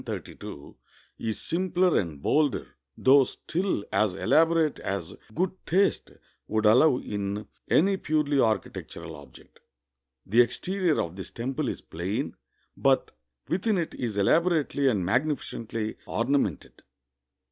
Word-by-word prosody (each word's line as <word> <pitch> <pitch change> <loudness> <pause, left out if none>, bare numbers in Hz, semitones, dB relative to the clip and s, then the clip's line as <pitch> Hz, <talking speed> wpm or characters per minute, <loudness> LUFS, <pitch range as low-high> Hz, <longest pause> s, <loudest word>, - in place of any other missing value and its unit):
1032, 70 - -8 0.4
is 110 -1 -3
simpler 180 0 +1
and 75 -7 -5
bolder, 150 -2 +1 0.2
though 135 +1 +6
still 175 - -2
as 105 -4 +2
elaborate 160 +6 +3
as 95 -4 -4 0.2
good 185 +1 +1 0.2
taste 195 +4 +2 0.4
would 110 0 0
allow 125 +6 +6
in 100 -2 -4 0.2
any 195 +4 +4
purely 150 -4 +1
architectural 105 -7 -2
object." 70 -1 -16 0.7
The 115 +5 +5
exterior 180 +6 0
of 85 +1 -2
this 95 - -7
temple 130 +3 -3
is - - -5
plain, 90 +6 -4 0.4
but - - +2 0.4
within 195 +4 +1
it 170 -3 -2
is 115 -5 -4
elabo 165 - +4
rately 145 -4 +1
and 100 -7 0
magnificently 115 - -2
ornamented. 135 +5 -1
130 Hz, 120 wpm, -27 LUFS, 105-165 Hz, 0.7 s, though